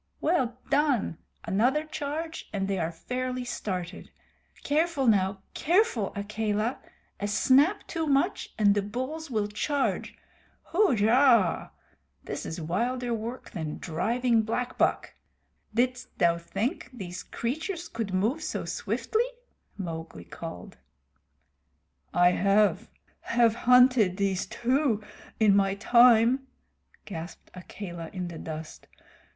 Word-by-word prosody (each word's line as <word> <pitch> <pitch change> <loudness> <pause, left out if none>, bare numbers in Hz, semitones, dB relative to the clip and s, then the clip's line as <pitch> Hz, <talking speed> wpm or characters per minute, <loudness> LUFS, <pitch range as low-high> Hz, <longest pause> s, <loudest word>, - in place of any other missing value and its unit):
"Well 260 -8 +1
done! 280 - +1 0.3
Another 250 +10 +2
charge 310 +1 -5
and 195 -2 -2
they 195 -1 -1
are 165 0 -1
fairly 250 +8 -4
started. 185 -7 -5 0.5
Careful, 300 -1 +1
now 195 -3 +2
careful, 335 - +2
Akela. 215 +3 -1 0.4
A 205 - -2
snap 270 - +3
too 325 -2 -3
much 285 +7 +1
and 205 -2 +5
the 205 - +1
bulls 260 +10 -5
will 215 -4 0
charge. 275 +7 -1 0.6
Hujah! 245 - +4 0.5
This - - -5
is 165 - -5
wilder 240 +9 -1
work 230 +3 -5
than 160 -4 -4
driving 230 +8 +1
black 240 +3 -2
buck. - - +1 0.6
Didst 245 +2 -1
thou 170 -1 +3
think 205 - -3
these 185 -8 -7
creatures 320 - -4
could 225 -8 -4
move 220 +12 0
so 310 - -3
swiftly?" 460 +2 -1 0.5
Mowgli 165 - -6
called. - - -9 1.3
"I 175 0 +5
have 200 +3 +2 0.3
have 235 -1 +3
hunted 250 -5 +5
these 195 -2 0
too 245 -1 0 0.4
in 210 -3 +5
my 195 -1 +2
time," 240 +4 +5 0.6
gasped 170 -2 -8
Akela 175 -2 -8
in 180 -2 -4
the 165 - -8
dust. 160 0 -8
225 Hz, 115 wpm, -28 LUFS, 195-260 Hz, 1.3 s, and